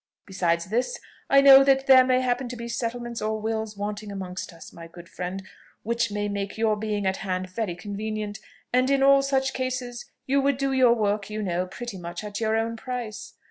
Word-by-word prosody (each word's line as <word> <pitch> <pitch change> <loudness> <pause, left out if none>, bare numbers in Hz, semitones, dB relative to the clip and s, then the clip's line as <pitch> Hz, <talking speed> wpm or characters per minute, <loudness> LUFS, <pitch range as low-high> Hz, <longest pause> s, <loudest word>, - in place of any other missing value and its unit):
Besides 170 -3 0
this, 250 - -1 0.3
I 275 0 +6
know 275 -1 +9
that 270 0 +3
there 260 -1 +8
may 255 0 +2
happen 250 0 -1
to 250 - -6
be 235 0 -6
settlements 235 0 -4
or 215 0 -1
wills 220 -1 -3
wanting 205 +1 -4
amongst 185 -2 -6
us, 165 -1 -13
my 165 -1 -10
good 170 +1 -13
friend, 185 +3 -5 0.4
which 235 +1 0
may 205 0 -2
make 200 0 -4
your 220 -1 +2
being 210 -1 -2
at 190 0 0
hand 185 -1 -3
very 190 -3 -3
convenient; 210 +1 -5 0.3
and, 255 +1 +3
in 275 -1 +3
all 275 0 +6
such 270 -1 0
cases, 255 -2 -4 0.2
you 275 +1 +2
would 280 -1 +1
do 275 0 0
your 255 -3 +5
work, 210 -2 -1
you 215 0 -4
know, 180 -1 -1
pretty 205 +1 -7
much 175 +2 -6
at 205 0 -5
your 220 -1 +1
own 230 +1 -2
price. 245 -3 -6
220 Hz, 205 wpm, -25 LUFS, 200-255 Hz, 0.4 s, know